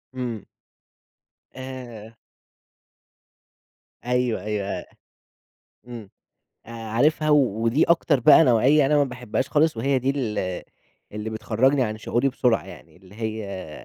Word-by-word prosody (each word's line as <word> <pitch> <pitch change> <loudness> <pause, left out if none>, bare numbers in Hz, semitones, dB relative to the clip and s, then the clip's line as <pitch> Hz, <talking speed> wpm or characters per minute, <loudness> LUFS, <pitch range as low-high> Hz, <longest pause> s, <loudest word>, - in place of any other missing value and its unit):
إمم. 120 -5 -5 1.1
آآ 125 -4 -9 1.9
أيوه، 125 -1 0
أيوه، 105 -2 -3
آآ، - - -5 1.0
إمم، 115 -5 -9 0.6
آآ، 115 - -12
عارفها، 120 +8 0
و 150 - +6 0.3
ودي 115 +7 +2
أكتر 165 -4 +2
بقى 125 - +7
نوعيّة 135 +3 +4
أنا 150 +2 +2
ما 145 - +4
باحبهاش 125 -1 -4
خالص 155 -3 +2
وهي 135 +3 +1
دي 130 +2 -1
ال 105 -8 -3 0.5
اللي 105 +1 -5
بتخرّجني 125 +5 +1
عن 110 -2 -3
شعوري 120 +4 0
بسرعة 125 -2 +1
يعني، - - -14
اللي 95 +2 -18
هي 105 -6 -5
120 Hz, 120 wpm, -23 LUFS, 110-135 Hz, 1.9 s, بقى